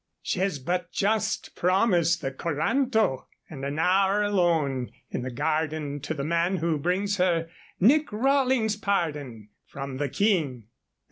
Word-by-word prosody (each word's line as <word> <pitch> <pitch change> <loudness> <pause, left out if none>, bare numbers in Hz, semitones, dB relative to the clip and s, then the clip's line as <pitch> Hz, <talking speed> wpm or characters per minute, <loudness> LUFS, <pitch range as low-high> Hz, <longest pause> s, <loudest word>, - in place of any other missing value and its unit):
She - - -2
has 190 -4 0
but 175 +5 -3
just 215 +2 -1
promised 180 -2 +2
the 135 - -1
coranto 170 - 0 0.2
and 135 -3 -8
an 140 +2 -3
hour 195 +4 +3
alone 165 -10 +1 0.2
in - - -2
the 130 - -4
garden 150 +1 -2
to 155 +3 -4
the 140 - -3
man 170 +4 +1
who 165 -3 0
brings 195 +6 0
her 170 -3 +1 0.3
Nick 290 - +4
Rawlings' 255 -1 +2
pardon 145 - -2 0.2
from 135 -1 -6
the 145 0 -1
King." 155 - 0
170 Hz, 140 wpm, -26 LUFS, 145-200 Hz, 0.3 s, Nick